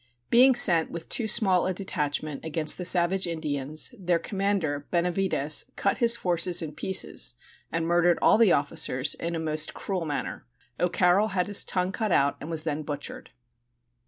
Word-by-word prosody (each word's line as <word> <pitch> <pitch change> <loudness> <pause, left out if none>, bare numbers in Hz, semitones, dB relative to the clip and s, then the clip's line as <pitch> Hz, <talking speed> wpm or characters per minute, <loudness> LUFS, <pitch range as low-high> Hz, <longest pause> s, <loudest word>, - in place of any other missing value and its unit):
Being 255 +2 +5
sent 170 -7 +6
with 170 -1 -9
too 230 - 0
small 190 -6 +3
a 185 - -3
detachment 150 -6 -3
against 160 0 0
the 180 - -5
savage 180 +1 +2
Indians, 155 - -1
their 175 -2 0
commander, 190 -7 -3
Benavides, 175 -4 0
cut 200 - -1
his 235 -1 +3
forces 175 -3 +1
in 155 -2 -7
pieces 190 -9 0 0.4
and 165 0 -2
murdered 175 0 +2
all - - +3
the 225 -6 +4
officers 145 -2 +1
in 170 0 -5
a - - -3
most 155 -1 -1
cruel 185 -4 -4
manner. 145 - -6 0.3
O'Carroll 180 +3 +2
had 180 - +1
his 205 -1 +1
tongue 185 0 -2
cut 215 0 -3
out 140 -3 +1
and 150 - -8
was 160 -2 -4
then 155 -2 -3
butchered. 145 -1 -7
170 Hz, 165 wpm, -25 LUFS, 155-190 Hz, 0.4 s, sent